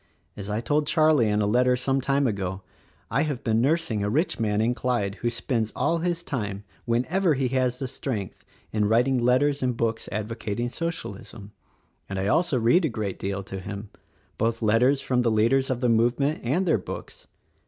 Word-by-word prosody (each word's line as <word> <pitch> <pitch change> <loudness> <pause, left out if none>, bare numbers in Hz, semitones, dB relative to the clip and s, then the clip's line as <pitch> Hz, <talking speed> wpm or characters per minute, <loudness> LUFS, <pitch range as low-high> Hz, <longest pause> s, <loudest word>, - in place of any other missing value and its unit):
As 100 0 -6
I 105 +2 -1
told 150 +4 0
Charlie 155 -9 +4
in 105 0 +1
a - - +1
letter 125 +4 +3
some 135 +2 0
time 140 +2 +1
ago, 95 -4 -2 0.5
I 130 +6 +2
have 145 -5 -2
been 110 -1 +2
nursing 140 -7 +1
a 105 - 0
rich 150 - 0
man 105 -2 +1
in 115 +3 +2
Clyde 120 -6 -1
who 120 - +1
spends 115 -1 -2
all 165 +1 +1
his 175 0 -1
time, 105 -9 -4 0.2
whenever 150 +9 +1
he 130 -1 0
has 130 -1 0
the 135 0 -3
strength, 115 -7 -5 0.3
in 105 -1 +1
writing 125 +5 +3
let 125 +2 +3
ters 145 -1 +1
and 125 -2 0
books 115 -1 -1
advocating 110 +2 -3
Socialism, 110 - -6 0.6
and 95 - -4
I 95 - -1
also 155 - +2
read 120 +11 +4
a 160 - +1
great 105 -5 -4
deal 100 0 -3
to 95 0 -6
him, 100 +2 -7 0.2
— - - -37
both 115 +1 0
letters 125 +6 +3
from 125 -1 +1
the 120 - +2
leaders 115 +5 +2
of 130 -2 -1
the 125 - +2
movement 120 +6 +2
and 150 +11 +1
their 160 - +2
books. - - -8
120 Hz, 195 wpm, -25 LUFS, 105-135 Hz, 0.6 s, Charlie